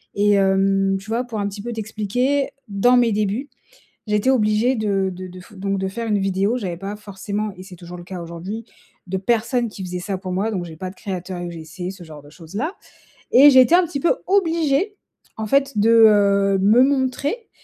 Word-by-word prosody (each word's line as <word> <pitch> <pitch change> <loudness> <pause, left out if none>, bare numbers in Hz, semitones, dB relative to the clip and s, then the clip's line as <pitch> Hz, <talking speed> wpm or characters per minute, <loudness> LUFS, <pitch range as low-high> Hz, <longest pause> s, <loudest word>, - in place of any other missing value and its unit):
Et 205 +1 +3
hem, 195 0 +2
tu 195 - -15
vois 230 +2 0
pour 230 -3 -5
un 200 - -1
petit 200 0 -7
peu 240 +3 -5
t'expliquer, 225 +6 -1 0.2
dans 215 +5 +3
mes 240 -2 +3
débuts, 210 +7 -1 0.6
j'étais 210 +4 +1
obligée 220 0 +2
de 200 -3 0
de 185 +1 -8
de 180 0 -11
f 195 +4 -16
donc 195 +1 -2
de 190 0 -2
faire 230 +4 -5
une 210 -1 +2
vidéo, 195 +4 0
j'avais 185 -7 -4
pas 195 +2 -5
forcément 205 +1 -5
et 185 - -10
c'est 190 -2 -12
toujours 175 +1 -10
le - - -9
cas 180 0 -7
aujourd'hui, 175 +7 -7 0.4
de 190 +1 -2
personne 235 +4 0
qui 200 -2 -8
faisait 180 0 -4
ça 190 +2 -3
pour 185 -1 -6
moi. 200 +5 -1
Donc 185 -5 -3
j'ai 165 -2 -10
pas 185 +3 -5
de - - -13
créateur 185 -2 -5
UGC 175 +1 -6
ce 190 -2 -13
genre 155 -3 -12
de 145 - -16
choses 165 +2 -14
là 305 - -1 0.6
et 280 +4 +8
j'ai 260 -1 +8
été 255 - +3
un 365 - +5
petit 305 -4 -4
peu 345 - +2
obligée 335 -1 +1 0.4
en 220 - -3
fait, 275 +1 +1
de, 210 +2 +3 0.2
heu, 200 -2 +3
me 215 +6 +5
montrer, 280 - -1
205 Hz, 215 wpm, -21 LUFS, 190-240 Hz, 0.6 s, et